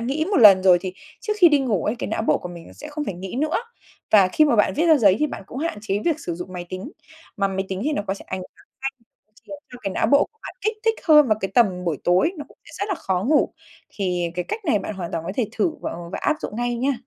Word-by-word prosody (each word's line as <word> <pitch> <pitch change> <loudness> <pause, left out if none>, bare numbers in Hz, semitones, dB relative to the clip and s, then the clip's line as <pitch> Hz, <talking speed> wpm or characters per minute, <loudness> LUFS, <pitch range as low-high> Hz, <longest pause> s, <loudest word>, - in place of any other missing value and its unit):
nghĩ 275 +7 -1
một 405 - +2
lần 200 -5 +8
rồi 180 -2 +6
thì 185 0 -5 0.3
trước 425 - -2
khi 355 -4 +8
đi 295 -2 +4
ngủ 215 -10 0
ấy, 215 - 0
cái - - -4
não 220 - -2
bộ - - +2
của 180 - -7
mình 170 -1 -10
nó - - -14
sẽ 300 - -10
không 300 0 -4
phải 200 - -4
nghĩ 190 +5 -7
nữa. 310 +2 0 0.5
Và 200 -4 +6
khi 305 +11 +4
mà 265 -6 +2
bạn 210 - +3
viết 330 +3 +1
ra 320 -2 +6
giấy 195 -4 +5
thì 300 - +2
bạn 280 - -7
cũng 260 - -8
hạn 320 -8 -3
chế 200 -1 -1
việc 320 -2 0
sử 170 - -4
dụng 180 +2 -8
máy 175 -1 -6
tính, 185 - -7 0.4
mà 200 -1 +1
máy 190 0 -2
tính 190 0 -4
thì 305 - 0
nó 280 - -1
có 195 - -1
thể - - -11
ảnh - - -3
hưởng 180 - -14 0.2
ngay, 270 - 0 0.6
khiến - - -7 0.2
cho 245 - -9
cái 195 - -2
não - - +1
bộ 280 +5 +5
của 445 - -38
bạn - - -8
kích 435 +1 -1
thích 450 0 +3
hơn 300 -3 +7
vào 215 -1 +2
cái 195 - -3
tầm 190 -7 +3
buổi 160 -5 -1
tối, 185 - +3
nó 295 - -5
cũng - - -20
sẽ - - -15
rất 405 - -2
là 390 - 0
khó 190 - -2
ngủ. 295 +3 +2 0.4
Thì 180 -3 -1
cái 180 -1 -2
cách 440 -1 -4
này 285 - +2
bạn 200 +2 -5
hoàn 175 -3 -6
toàn 165 -1 -3
có 190 - -3
thể 235 -5 0
thử 335 - +1
và, - - -4
ờ, - - -7
và - - -3
áp 305 - +2
dụng 210 - -6
ngay 240 0 -1
nha. 265 +4 +1
215 Hz, 305 wpm, -22 LUFS, 185-300 Hz, 0.6 s, lần